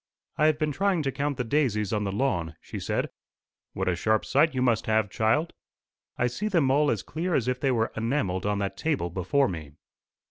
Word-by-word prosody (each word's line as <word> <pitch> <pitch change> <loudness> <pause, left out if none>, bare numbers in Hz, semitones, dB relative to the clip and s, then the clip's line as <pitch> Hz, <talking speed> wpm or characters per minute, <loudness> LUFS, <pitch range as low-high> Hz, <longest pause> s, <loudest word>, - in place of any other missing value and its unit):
"I 155 - +3
have 155 -1 +3
been 155 -1 0
trying 185 +1 +1
to 135 - 0
count 140 0 -2
the 125 - 0
daisies 115 -6 0
on 105 -1 0
the 100 - -1
lawn," 90 - -1
she - - -7
said. - - -2 0.6
"What 95 0 -2
a 90 - +2
sharp 110 +4 +1
sight 145 +2 +3
you 130 - 0
must 120 -5 +1
have, 110 -2 +2
child!" 145 +10 +1 0.6
"I 120 - +2
see 125 - -2
them 165 -10 +2
all 145 +2 +3
as - - -1
clear 170 +2 -2
as 125 - +1
if 125 0 0
they 135 - +1
were 115 -3 +1
enamelled 110 -5 -1
on 105 0 +1
that 100 -1 -3
table 145 - -1
before 95 - +1
me." 80 -5 -6
125 Hz, 215 wpm, -27 LUFS, 100-150 Hz, 0.6 s, I